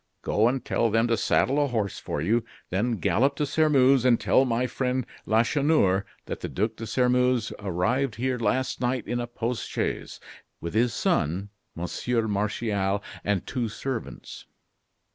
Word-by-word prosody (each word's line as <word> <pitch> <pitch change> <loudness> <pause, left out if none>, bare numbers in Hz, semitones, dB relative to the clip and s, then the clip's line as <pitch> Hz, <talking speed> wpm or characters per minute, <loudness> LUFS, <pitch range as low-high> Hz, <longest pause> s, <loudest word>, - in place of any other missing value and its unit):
go 110 +2 +3
and 125 0 -1
tell 115 - +1
them 115 +2 +2
to 115 - +2
saddle 135 +6 +2
a - - +1
horse 110 -6 -2
for - - -4
you, 115 +6 +2 0.3
then 110 +7 +1
gallop 115 - +1
to 150 - 0
Sairmeuse, 140 -3 +4
and 125 -2 +4
tell 135 - +3
my 120 0 0
friend 125 -1 -1 0.2
Lacheneur 115 -4 +3 0.2
that - - -5
the - - -5
Duc 110 +3 -1
de 115 - -7
Sairmeuse 125 0 +2
arrived 105 +7 0
here 125 +2 -1
last 125 +5 0
night 125 -1 -1
in 120 +3 -1
a 120 - -3
post 120 0 -3
chaise, - - -3 0.4
with 85 - -5
his 115 +2 +2
son, 90 +4 0 0.3
Monsieur 110 +7 -1
Martial, 100 -1 -1 0.2
and 100 -3 0
two 120 -4 -2
servants. 130 +2 -6
120 Hz, 160 wpm, -26 LUFS, 105-125 Hz, 0.4 s, Sairmeuse